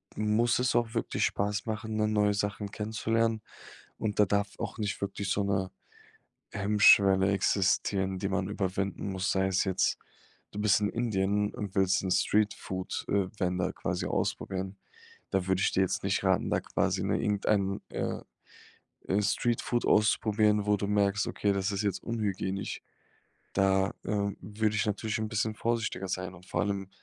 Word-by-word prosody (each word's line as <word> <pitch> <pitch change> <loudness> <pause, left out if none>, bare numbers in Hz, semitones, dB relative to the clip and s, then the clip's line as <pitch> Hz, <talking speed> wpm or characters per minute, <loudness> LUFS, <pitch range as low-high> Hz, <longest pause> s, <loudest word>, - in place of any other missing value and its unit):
muss 110 +3 +2
es 125 -1 +1
auch 120 -1 +1
wirklich 115 - 0
Spaß 105 +1 -1
machen, 110 -1 -3
dann 110 0 +1
neue 105 -1 +3
Sachen 105 0 -2
kennenzulernen. 110 +1 0 0.6
Und 105 -2 -3
da 105 - +7
darf 100 0 -1
auch - - -4
nicht 105 -2 -3
wirklich 100 0 -3
so 100 - +1
'ne 95 -2 -1 0.8
Hemmschwelle 100 -1 +5
existieren, 95 0 +1
die 95 - -2
man 95 -1 -1
überwinden 100 0 -2
muss. 95 0 -1
Sei 95 0 +2
es 95 -1 +2
jetzt, 95 -1 +1 0.5
du 105 - -6
bist 105 -2 +4
in 105 - +1
Indien 105 -3 0
und 105 -5 -6
willst 95 +1 +3
'n 95 - -1
Streetfood, 100 -2 0
äh, 100 -2 +2
Vendor 90 -1 0
quasi - - -3
ausprobieren. 95 +1 -2 0.5
Da 95 -2 0
würde 95 0 +1
ich - - +2
dir 95 - +2
jetzt 95 - 0
nicht - - 0
raten, - - +2
da - - +2
quasi, - - -1
ne, - - 0
irgendeinen, 100 -1 0
äh, - - -3 1.0
Streetfood 120 +3 0
auszuprobieren, 105 -1 +3
wo 105 0 +3
du 100 - -2
merkst, 100 0 +1
okay, 100 - 0
das 100 +1 -1
ist 100 +1 -2
jetzt 100 -3 -1
unhygienisch. 100 -4 -3 0.7
Da, 95 0 +2
äh, 100 -1 0
würde 105 +2 -1
ich 110 - +1
natürlich 105 +1 -1
'n 110 0 -2
bisschen 110 0 -1
vorsichtiger 115 -4 -2
sein. 95 0 -3
Und 90 +1 -15
vor - - -1
allem, 100 -2 -2
100 Hz, 160 wpm, -29 LUFS, 95-105 Hz, 1.0 s, da